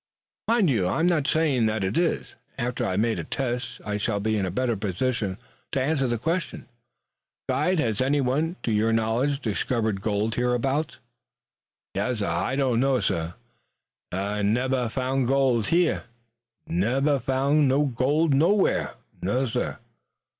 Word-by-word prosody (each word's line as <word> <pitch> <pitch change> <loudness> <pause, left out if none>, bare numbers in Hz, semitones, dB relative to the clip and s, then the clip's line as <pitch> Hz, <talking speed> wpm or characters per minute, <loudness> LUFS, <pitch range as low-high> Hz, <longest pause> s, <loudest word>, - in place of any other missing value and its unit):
"Mind 230 -4 +3
you, 95 -8 +1
I 95 - 0
am 165 - +3
not 160 -5 +2
saying 145 -9 +2
that 110 -1 -1
it 95 - -1
is. 170 0 0 0.2
After 120 +1 -2
I - - 0
have - - +2
made 115 0 0
a - - -3
test 125 -2 -3
I 105 -1 -2
shall 105 0 -1
be 110 +2 0
in 95 -3 -1
better 120 +3 0
position 100 0 -2 0.4
to 140 - +1
answer 135 0 +1
that 120 -2 -2
question. 165 +2 -2 0.8
Guide, 185 0 +1
has 115 -8 0
anyone, 140 +4 +1
to 115 - 0
your 110 +1 +2
knowledge, 115 +6 +1
discovered 110 -2 -1
gold 105 +1 0
hereabouts?" 125 +5 0 1.0
"Yassir; 120 -5 -1
Ah 85 +9 -1
doan 130 -4 +1
know. 135 0 +2 1.1
Ah 100 +3 -2
nebbah 125 +4 +1
found 130 +2 0
no - - -2
gold 130 -4 +2
heah 170 0 +2 0.6
nebbah 135 - +1
found 135 +3 +2
no 140 +3 +3
gold 145 +4 +1
nowhere. 170 +9 +2 0.3
Nassir." 125 +5 -1
125 Hz, 145 wpm, -25 LUFS, 110-140 Hz, 1.1 s, Mind